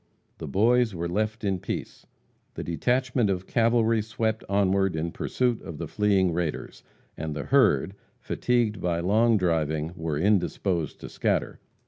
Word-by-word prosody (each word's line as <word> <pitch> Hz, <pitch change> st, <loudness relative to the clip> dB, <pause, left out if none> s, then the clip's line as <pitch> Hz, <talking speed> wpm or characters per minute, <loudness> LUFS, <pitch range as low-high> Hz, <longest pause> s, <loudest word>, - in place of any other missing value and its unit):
The -, -, -6 dB
Boys 115 Hz, -, +2 dB
were 85 Hz, 0 st, -2 dB
left 110 Hz, +5 st, -2 dB
in 95 Hz, -2 st, 0 dB
peace. -, -, -6 dB, 0.5 s
The -, -, -4 dB
detachment 125 Hz, +5 st, 0 dB
of 95 Hz, -1 st, -2 dB
cavalry 115 Hz, -1 st, +2 dB
swept 110 Hz, +1 st, -2 dB
onward 95 Hz, -2 st, +2 dB
in 80 Hz, +1 st, -2 dB
pursuit 125 Hz, +4 st, -1 dB
of 80 Hz, -, -8 dB
the 85 Hz, -, -5 dB
fleeing 95 Hz, -2 st, +2 dB
raiders, 85 Hz, -2 st, -3 dB, 0.3 s
and 80 Hz, -1 st, -5 dB
the 75 Hz, -, -3 dB
herd, 100 Hz, -, +3 dB, 0.3 s
fatigued 120 Hz, -4 st, 0 dB
by 85 Hz, -1 st, 0 dB
long 110 Hz, +6 st, +3 dB
driving, 80 Hz, -3 st, 0 dB
were 80 Hz, -4 st, -3 dB
indisposed 90 Hz, -2 st, 0 dB
to -, -, -7 dB
scatter. -, -, -1 dB
100 Hz, 145 wpm, -26 LUFS, 85-110 Hz, 0.5 s, herd